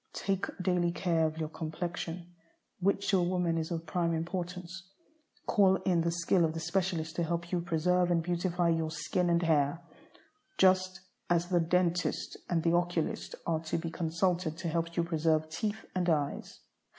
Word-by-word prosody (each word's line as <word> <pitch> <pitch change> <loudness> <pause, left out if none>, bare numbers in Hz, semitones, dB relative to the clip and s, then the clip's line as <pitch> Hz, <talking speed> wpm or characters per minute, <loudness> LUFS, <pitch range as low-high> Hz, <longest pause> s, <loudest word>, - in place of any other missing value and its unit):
Take 195 0 -1
daily 180 -2 +1
care 170 -2 +1
of 155 0 -6
your 155 -1 -3
complexion, 170 +2 -5 0.5
which 200 +2 +1
to 195 - +4
a - - +2
woman 175 -1 +1
is 160 - -3
of 165 -1 -3
prime 170 0 0
importance. 180 +2 -5 0.6
Call 195 -3 +4
in 175 -3 +2
the 170 - +1
skill 170 +1 +2
of 160 0 0
the - - -2
specialist 170 -1 -1
to 170 - +1
help 170 +1 -2
you 180 -2 +1
preserve 175 +2 +1
and 170 -2 +2
beautify 175 0 0
your 165 -1 +1
skin 165 +3 -1
and 170 0 +2
hair, 155 -1 +2 0.8
just 185 0 +3 0.3
as 175 0 +2
the 180 -2 +3
dentist 175 +1 0
and 165 -2 +1
the 170 - +3
oculist 175 -2 -1
are 165 -2 +1
to 155 - -1
be 165 0 -4
consulted 170 0 0
to 175 -2 -3
help 165 +1 -2
you 170 - +3
preserve 160 -1 +1
teeth 215 +4 -3
and 180 -1 0
eyes. 145 -3 -1
170 Hz, 175 wpm, -31 LUFS, 165-180 Hz, 0.8 s, to